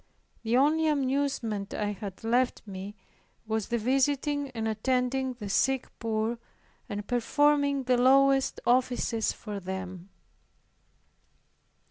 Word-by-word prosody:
The 230 +2 +1
only 310 +4 +3
amusement 265 -8 -1
I 210 0 -1
had 200 -1 -8
left 245 +2 +1
me, 195 0 -7 0.5
was 220 -1 -2
the 235 - 0
visiting 275 +4 +1
and 225 -1 -2
attending 255 +4 0
the 225 -4 -8
sick 265 +6 +1
poor, 225 +1 -1 0.5
and 205 0 -4
performing 280 +4 +2
the 250 -1 +2
lowest 270 +1 +4
offices 245 -2 +1
for 210 -2 -7
them. 190 -1 -6
245 Hz, 110 wpm, -28 LUFS, 215-270 Hz, 0.5 s, lowest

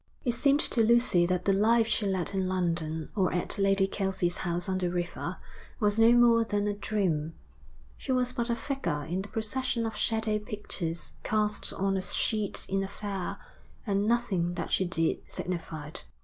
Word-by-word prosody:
It 245 - +2
seemed 275 +4 +3
to 235 - +2
Lucy 225 -6 +4
that 180 0 -1
the 195 - +4
life 225 +3 +4
she 220 -2 0
led 190 -1 -1
in 190 -1 0
London, 165 -4 -1
or 190 -3 +2
at 175 +3 -1
Lady 195 0 +3
Kelsey's 190 -3 -1
house 175 0 -2
on 185 -1 -1
the 180 -1 0
river, 175 0 -3 0.4
was 210 -1 +2
no 225 +1 +7
more 235 -1 +5
than 205 -2 -1
a 205 - 0
dream. 180 -7 -1 0.6
She 270 - -4
was 250 -1 +2
but 235 -1 -2
a 235 - +2
figure 225 - -3
in 175 +4 -2
the 200 - -7
procession 230 +2 -1
of 220 -1 -4
shadow 220 0 +1
pictures 200 -6 -4
cast 210 -1 +1
on 195 0 0
a - - -1
sheet 210 +1 0
in 195 0 0
a - - -3
fair, 195 -2 -5 0.5
and 200 -1 0
nothing 200 -8 0
that 175 - -4
she 190 - +2
did 165 -2 +1
signified. 160 -4 -3
195 Hz, 180 wpm, -29 LUFS, 180-225 Hz, 0.6 s, no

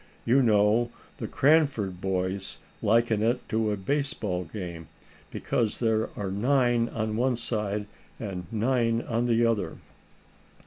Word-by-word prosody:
You 130 +4 +4
know, 110 0 +3 0.3
the - - -4
Cranford 135 - +2
boys 95 0 -1 0.2
liken 115 -1 +3
it 120 +3 0
to 110 -1 +1
a 105 - -1
baseball 105 -6 -1
game, 85 -2 -7 0.4
because 110 -3 -1
there 110 -2 +1
are 100 -2 -3
nine 120 +2 +2
on 110 -1 -2
one 125 +1 +2
side 105 -3 -2 0.3
and 90 -5 -5
nine 115 0 +1
on 120 +1 -1
the 120 0 +3
other." 115 -3 0
110 Hz, 130 wpm, -27 LUFS, 100-120 Hz, 0.4 s, You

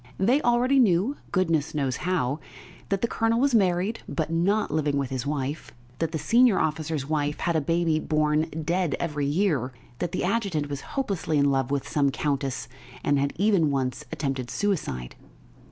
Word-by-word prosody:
They 245 +10 +3
already 245 +2 +3
knew, 215 +4 +3
goodness 165 -5 +1
knows 135 -3 0
how, 155 -6 -1 0.5
that 195 +1 -1
the - - +3
colonel 225 0 +1
was 275 0 +2
married, 190 0 +2
but 160 -1 -2
not 195 +5 +1
living 150 -2 +1
with 135 -2 -2
his 130 0 -3
wife; 145 +1 -3 0.3
that 165 -1 -1
the 160 - -2
senior 235 +4 +4
officer's 155 -2 -1
wife 150 -1 -1
had 170 - 0
a 160 - +2
baby 165 +1 +1
born 155 0 +1
dead 160 +1 -1
every 150 -4 -1
year; 145 - +1 0.3
that 175 - -2
the - - -2
adjutant 185 -7 0
was 140 -1 -4 0.2
hopelessly 195 - 0
in 140 0 +3
love 135 -2 0
with 140 -1 -1
some 140 -2 +2
countess, 135 -4 -2 0.4
and 145 -1 +2
had 140 0 0
even 195 -5 +3
once 130 -2 -1
attempted 135 -4 -3
suicide. 150 - -2
155 Hz, 170 wpm, -26 LUFS, 140-190 Hz, 0.5 s, senior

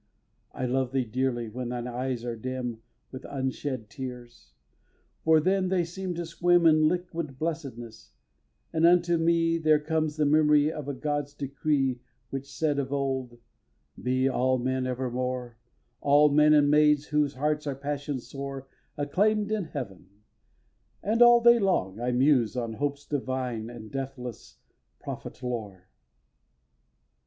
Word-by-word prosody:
xiv. - - -6
I - - +1
love 130 0 -1
thee 130 -2 +1
dearly 120 0 -1
when 120 +2 -5
thine 120 -1 -4
eyes 125 0 -3
are 120 -1 -3
dim 125 -1 -4 0.3
With 130 0 -8
unshed 130 -3 -3
tears; 125 -1 -9 0.7
for 160 0 +5
then 185 +3 +1
they 185 -2 +2
seem 180 +1 -5
to 170 0 -3
swim 175 +1 +2
In 155 -1 +6
liquid 170 -5 -3
blessedness, 130 -8 -5 0.6
and 165 +1 +4
unto 175 -1 +4
me 165 0 +2
There 155 -1 +4
comes 155 0 -1
the 155 -1 +1
memory 150 0 +4
of 150 -3 -7
a 140 - -3
god's 145 +1 -3
decree 140 -2 -1 0.3
Which 135 +1 -5
said 145 0 0
of 135 -1 -3
old: 135 -3 -2 0.6
"Be 130 +1 +1
all 130 0 +1
men 130 +1 -1
evermore, 125 -1 -3 0.4
All 145 +1 +5
men 150 +1 +5
and 145 -1 +4
maids 150 -1 +4
whose 150 -2 0
hearts 150 +2 -1
are 140 - -2
passion 140 0 -3
sore, 135 +1 -7 0.3
Acclaim'd 205 +9 +1
in 215 -4 0
Heaven!" 100 - -7 0.9
and 220 +4 +1
all 240 -1 +7
day 235 0 +7
long 115 - 0
I 125 +1 -1
muse 125 -2 +3
On 115 -2 -2
hope's 145 +3 -3
divine 130 -5 -3
and 115 -3 -10
deathless 130 -3 -6 0.4
prophet - - -8
lore. 105 -7 -5
140 Hz, 145 wpm, -27 LUFS, 125-155 Hz, 0.9 s, all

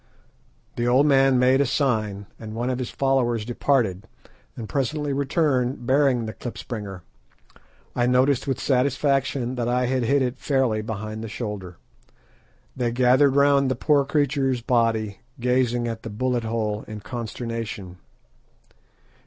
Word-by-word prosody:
The 120 0 0
old 130 +4 +4
man 135 -2 +4
made 130 +2 +4
a - - +3
sign, 110 -8 0
and 110 -1 -8
one 120 +3 -1
of 125 - -2
his 125 - -3
followers 125 -5 0
departed, 115 -5 0 0.5
and 115 -3 -6
presently 145 +3 -1
returned 135 -3 0
bearing 130 -3 +2
the 110 - -5
klipspringer. 105 -4 -7 0.9
I 120 0 +2
noticed 130 +2 +2
with 135 - -1
satisfaction 135 -1 +1
that 120 -1 -1
I 125 +1 +1
had 130 +1 0
hit 135 +3 +2
it 125 0 -3
fairly 130 -6 +1
behind 110 0 -5
the 115 - -6
shoulder. 100 -7 -6 1.0
They 120 -2 -1
gathered 130 +3 +4
round 140 -1 +4
the 130 - 0
poor 145 +3 +3
creature's 135 -3 0
body, 115 -4 +1 0.2
gazing 120 -1 +1
at 115 -1 -4
the 115 - -7
bullet 120 +2 -1
hole 110 -2 -2
in 110 -1 -7
consternation. 110 -4 -6
125 Hz, 140 wpm, -24 LUFS, 110-135 Hz, 1.0 s, old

